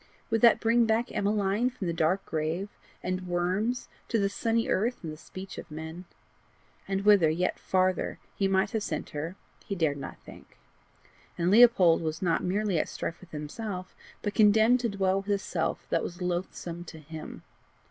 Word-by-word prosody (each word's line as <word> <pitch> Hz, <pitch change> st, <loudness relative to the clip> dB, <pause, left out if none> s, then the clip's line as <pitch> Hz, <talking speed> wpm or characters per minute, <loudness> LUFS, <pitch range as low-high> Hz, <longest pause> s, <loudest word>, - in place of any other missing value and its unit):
would 225 Hz, -1 st, +2 dB
that 235 Hz, -2 st, +7 dB
bring 230 Hz, +1 st, +3 dB
back 225 Hz, +2 st, +1 dB
Emmeline 205 Hz, +3 st, +1 dB
from 240 Hz, -6 st, -6 dB
the 170 Hz, -, -1 dB
dark 165 Hz, +4 st, +1 dB
grave 160 Hz, +5 st, -2 dB, 0.3 s
and 185 Hz, 0 st, -1 dB
the -, -, -10 dB
worms 185 Hz, +7 st, -1 dB, 0.2 s
to 230 Hz, -, +1 dB
the 200 Hz, -2 st, +2 dB
sunny 230 Hz, +2 st, 0 dB
earth 230 Hz, +4 st, 0 dB
and 160 Hz, -2 st, -4 dB
the -, -, -8 dB
speech 185 Hz, +4 st, -9 dB
of -, -, -10 dB
men? 160 Hz, +3 st, -7 dB, 0.8 s
And 195 Hz, +1 st, -1 dB
whither, 200 Hz, -6 st, +6 dB
yet 175 Hz, +3 st, 0 dB
farther, 185 Hz, -1 st, +1 dB, 0.2 s
he 195 Hz, -, +1 dB
might 195 Hz, +1 st, +2 dB
have 220 Hz, -, -1 dB
sent 155 Hz, -6 st, -4 dB
her, 160 Hz, +5 st, -4 dB, 0.3 s
she 200 Hz, -, -2 dB
dared 155 Hz, -5 st, +1 dB
not 140 Hz, -, -7 dB
think. -, -, -14 dB, 0.8 s
And 175 Hz, +1 st, +1 dB
Leopold 205 Hz, -8 st, +6 dB
was 160 Hz, 0 st, -2 dB
not 170 Hz, -3 st, +1 dB
merely 195 Hz, -1 st, +1 dB
at -, -, -1 dB
strife 170 Hz, -, -5 dB
with 185 Hz, -, -14 dB
himself, 185 Hz, +5 st, -6 dB, 0.3 s
but 205 Hz, -, -1 dB
condemned 220 Hz, +3 st, +5 dB
to 235 Hz, -1 st, 0 dB
dwell 195 Hz, -1 st, +1 dB
with 200 Hz, -, -11 dB
a 200 Hz, -, +3 dB
self 180 Hz, -4 st, -2 dB
that 165 Hz, -, +2 dB
was 175 Hz, -, -6 dB
loathsome 175 Hz, -1 st, -3 dB
to 160 Hz, -, -10 dB
him. 155 Hz, 0 st, -9 dB
190 Hz, 185 wpm, -28 LUFS, 170-210 Hz, 0.8 s, that